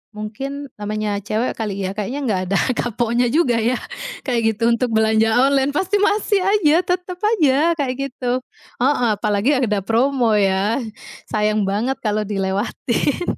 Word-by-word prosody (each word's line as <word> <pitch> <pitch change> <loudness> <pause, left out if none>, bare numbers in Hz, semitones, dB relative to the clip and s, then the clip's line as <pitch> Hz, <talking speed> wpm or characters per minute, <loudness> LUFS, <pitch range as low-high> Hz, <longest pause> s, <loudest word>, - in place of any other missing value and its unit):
mungkin, 270 +6 -6
namanya 210 0 -2
cewek 220 +4 0
kali 210 -3 -2
ya, 190 - -2
kayaknya 215 +7 -3
enggak 205 -7 0
ada 200 - +2 0.2
kapoknya 240 +1 0
juga 260 -1 +2
ya 235 +3 +1 0.5
kayak 245 -4 0
gitu, 230 - -5
untuk 240 +1 +1
belanja 220 0 +3 0.2
online 275 0 +2
pasti 385 +4 +1
masih 415 0 +2
saja, 380 -5 +3
tetap 360 0 -2
saja 335 -7 +2
kayak 270 -4 -1 0.2
gitu, 250 0 -2 0.4
heeh, 255 -2 +2
apalagi 210 +4 0
ada 210 -6 0
promo 240 0 +2
ya, 200 +5 +1 0.5
sayang 215 0 +1
banget 225 +7 -1
kalau 215 -1 -1
dilewatin. 210 - -1
240 Hz, 145 wpm, -20 LUFS, 215-280 Hz, 0.5 s, belanja